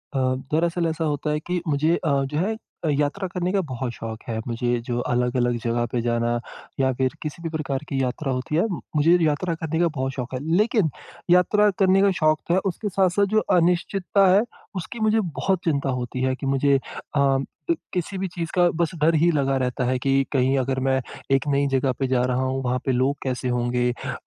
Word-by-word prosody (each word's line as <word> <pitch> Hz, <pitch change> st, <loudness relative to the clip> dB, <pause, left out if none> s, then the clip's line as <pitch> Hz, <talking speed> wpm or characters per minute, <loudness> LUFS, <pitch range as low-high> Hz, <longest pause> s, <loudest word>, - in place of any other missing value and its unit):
अ, -, -, +2 dB, 0.3 s
दरअसल 170 Hz, +2 st, +1 dB
ऐसा 160 Hz, 0 st, -2 dB
होता 150 Hz, 0 st, -1 dB
है 150 Hz, -, 0 dB
कि 180 Hz, -1 st, -1 dB
मुझे 155 Hz, +3 st, +2 dB
अ, 140 Hz, -5 st, +1 dB
जो 145 Hz, +2 st, -4 dB
है 200 Hz, +6 st, 0 dB, 0.3 s
अ, -, -, +1 dB
यात्रा 150 Hz, +7 st, 0 dB
करने 180 Hz, 0 st, -2 dB
का 195 Hz, -1 st, +2 dB
बहुत 125 Hz, -1 st, -3 dB
शौक 110 Hz, -1 st, -7 dB
है, 115 Hz, -2 st, -2 dB
मुझे 120 Hz, +1 st, 0 dB
जो 120 Hz, -1 st, -1 dB
अलग-अलग 120 Hz, 0 st, +1 dB
जगह 120 Hz, 0 st, +1 dB
पे 120 Hz, -, 0 dB
जाना 120 Hz, 0 st, 0 dB, 0.4 s
या 130 Hz, -1 st, +3 dB
फिर 130 Hz, +1 st, 0 dB
किसी 155 Hz, +2 st, -6 dB
भी 165 Hz, -, -2 dB
प्रकार 150 Hz, -3 st, -3 dB
की 135 Hz, -2 st, -1 dB
यात्रा 135 Hz, +2 st, -2 dB
होती 130 Hz, +3 st, -2 dB
है, 170 Hz, -, +3 dB, 0.3 s
मुझे 165 Hz, +4 st, +5 dB
यात्रा 160 Hz, +3 st, 0 dB
करने 160 Hz, 0 st, -1 dB
का 175 Hz, -, +4 dB
बहुत 130 Hz, 0 st, -1 dB
शौक 125 Hz, -1 st, -5 dB
है। -, -, -2 dB, 0.2 s
लेकिन 215 Hz, -4 st, +2 dB, 0.4 s
यात्रा 210 Hz, +4 st, +5 dB
करने 190 Hz, 0 st, +4 dB
का 200 Hz, 0 st, +4 dB
शौक 155 Hz, 0 st, +4 dB
तो 170 Hz, -, +2 dB
है 185 Hz, -, +4 dB
उसके 210 Hz, +4 st, -5 dB
साथ-साथ 190 Hz, +1 st, +2 dB
जो -, -, +6 dB, 0.2 s
अनिश्चितता 180 Hz, +3 st, +2 dB
है, 205 Hz, -, +5 dB, 0.3 s
उसकी 190 Hz, +6 st, -5 dB
मुझे 220 Hz, 0 st, +3 dB, 0.2 s
बहुत 190 Hz, -2 st, +1 dB
चिंता 140 Hz, -4 st, 0 dB
होती 125 Hz, +1 st, -4 dB
है, 130 Hz, 0 st, +1 dB
कि 135 Hz, -, -7 dB
मुझे 140 Hz, 0 st, +3 dB
अ, -, -, -4 dB, 0.4 s
क 135 Hz, -1 st, +3 dB, 0.5 s
किसी 185 Hz, +1 st, -2 dB
भी 190 Hz, +1 st, -2 dB
चीज़ 170 Hz, -2 st, -5 dB
का 175 Hz, -1 st, +5 dB
बस 165 Hz, -1 st, 0 dB
डर 160 Hz, +2 st, +4 dB
ही 165 Hz, +3 st, +4 dB
लगा 135 Hz, -3 st, +1 dB
रहता 125 Hz, 0 st, -1 dB
है 130 Hz, +1 st, +1 dB
कि 135 Hz, +1 st, +2 dB
कहीं 135 Hz, 0 st, +2 dB
अगर 130 Hz, 0 st, -1 dB
मैं 130 Hz, 0 st, +3 dB, 0.3 s
एक 135 Hz, +2 st, +2 dB
नई 140 Hz, 0 st, +2 dB
जगह 135 Hz, -1 st, +1 dB
पे 135 Hz, -, +1 dB
जा 130 Hz, -1 st, +2 dB
रहा 125 Hz, -, 0 dB
हूँ, 130 Hz, 0 st, -1 dB
वहाँ 125 Hz, +1 st, 0 dB
पे 135 Hz, -, +2 dB
लोग 130 Hz, +3 st, +1 dB
कैसे 130 Hz, -1 st, -2 dB
होंगे? 125 Hz, 0 st, +1 dB
अ, 120 Hz, -, -5 dB
140 Hz, 220 wpm, -24 LUFS, 130-175 Hz, 0.5 s, जो